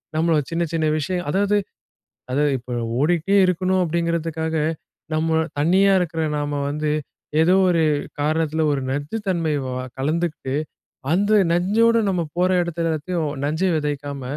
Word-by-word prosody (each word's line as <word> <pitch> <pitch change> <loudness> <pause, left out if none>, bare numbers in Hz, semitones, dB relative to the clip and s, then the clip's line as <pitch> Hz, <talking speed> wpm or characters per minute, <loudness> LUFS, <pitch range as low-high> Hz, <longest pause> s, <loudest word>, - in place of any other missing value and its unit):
நம்ம 160 0 +2
சின்ன, 165 +1 0
சின்ன 160 -1 +1
விஷயம், 180 +2 -3
அதாவது 205 +3 +2 0.8
அதாவது 145 +2 +2
இப்ப 125 0 -9 0.3
ஓடிகிட்டே 175 +5 +2
இருக்கணும் 185 +1 +1
அப்பிடிங்கிறதுக்காக 165 -1 -1 0.6
நம்ம 160 +1 +1
தனியா 190 +6 +4
இருக்கிற 165 -2 -1 0.2
நாம 145 0 -2
வந்து 150 +1 -1 0.5
ஏதோ 170 +3 +4
ஒரு 170 -2 +3 0.4
காரணத்தில 155 +1 0
ஒரு 140 - 0
நச்சுத் 145 +11 -3
தன்மை 165 -4 0 0.5
கலந்துக்கிட்டு, 150 -1 -2 0.6
அந்த 205 +5 +3
நஞ்சோட 215 +7 +3
நம்ம 180 -2 0 0.2
போற 180 +1 +3
இடத்துல 170 -1 -2
எல்லாத்தையும் 160 0 -2
நஞ்சு 160 +6 0
விதைக்காம, 145 -2 -3
165 Hz, 125 wpm, -22 LUFS, 150-180 Hz, 0.8 s, தனியா